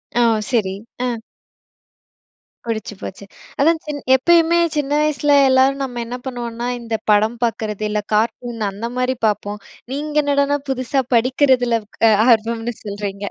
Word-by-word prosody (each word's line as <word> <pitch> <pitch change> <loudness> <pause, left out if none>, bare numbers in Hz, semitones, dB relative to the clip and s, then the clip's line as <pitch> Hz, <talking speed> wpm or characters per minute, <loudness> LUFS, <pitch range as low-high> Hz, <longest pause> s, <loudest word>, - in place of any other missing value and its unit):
ஒ! - - +2 0.3
சரி. 215 -7 +1 0.3
ஆ. 245 -2 -1 1.5
புடிச்சு 220 -2 -4
போச்சு. 200 +1 -8 0.3
அதான் 320 +3 +3 0.4
எப்பயுமே 335 +4 +4 0.2
சின்ன 290 -2 -1
வயசுல 295 -1 +1 0.2
எல்லாரும் 265 +1 +3
நம்ம 245 -2 -5
என்ன 245 +2 -5
பண்ணுவோம்னா, 240 -2 -4
இந்த 230 -1 -3 0.2
படம் 215 +3 +3
பாக்குறது 215 -2 -2
இல்ல 210 0 -1
கார்ட்டூன் 225 0 -1
அந்த 215 +4 -5
மாரி 255 +1 0
பாப்போம். 210 0 -2 0.3
நீங்க 300 +1 -4
என்னடானா 285 0 +2
புதுசா 265 +1 0
படிக்கிறதுல 250 -1 +3 0.3
அ - - +7 0.2
ஆர்வம்னு 230 +1 +1
சொல்றீங்க! 200 -1 -5
240 Hz, 125 wpm, -19 LUFS, 220-270 Hz, 1.5 s, அ